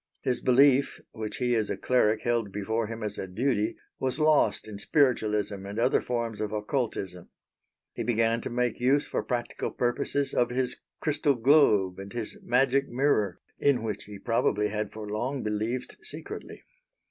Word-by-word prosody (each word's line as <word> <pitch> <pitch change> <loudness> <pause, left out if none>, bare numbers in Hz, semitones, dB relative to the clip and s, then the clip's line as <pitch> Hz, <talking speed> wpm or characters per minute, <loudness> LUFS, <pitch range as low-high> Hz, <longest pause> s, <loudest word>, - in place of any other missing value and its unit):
His 125 -2 0
belief, 135 +1 +4
which 110 -2 -5
he 125 -1 +1
as 110 -3 +1
a - - -2
cleric 110 -4 +2
held 115 -4 0
before 105 +3 -1
him 115 0 -6
as 105 -1 -3
a 95 - -4
duty, 110 +2 0 0.2
was 130 -1 -1
lost 150 -10 +3
in 105 -2 -8
spiritualism 105 -7 +1
and 100 +2 -7
other 120 +3 +3
forms 115 -3 -3
of 105 -1 -2
occultism. 105 -5 -3 0.6
He - - -3
began 115 0 +1
to - - -4
make 120 -1 -1
use 135 +4 +3
for - - -2
practical 120 -2 -3
purposes 135 +3 -1
of 120 - +2
his 125 0 -1 0.3
crystal 150 -2 +1
globe 110 -8 +4
and 100 0 -8
his 115 -3 -4
magic 135 +2 +2
mirror 120 -8 +1 0.2
in 135 -5 +2
which 110 -2 -4
he 105 -1 -9
probably 105 -1 +1
had 105 0 -3
for 110 -1 -7
long 125 +6 -2
believed 110 +4 -2
secretly. - - -7
115 Hz, 165 wpm, -28 LUFS, 105-130 Hz, 0.6 s, belief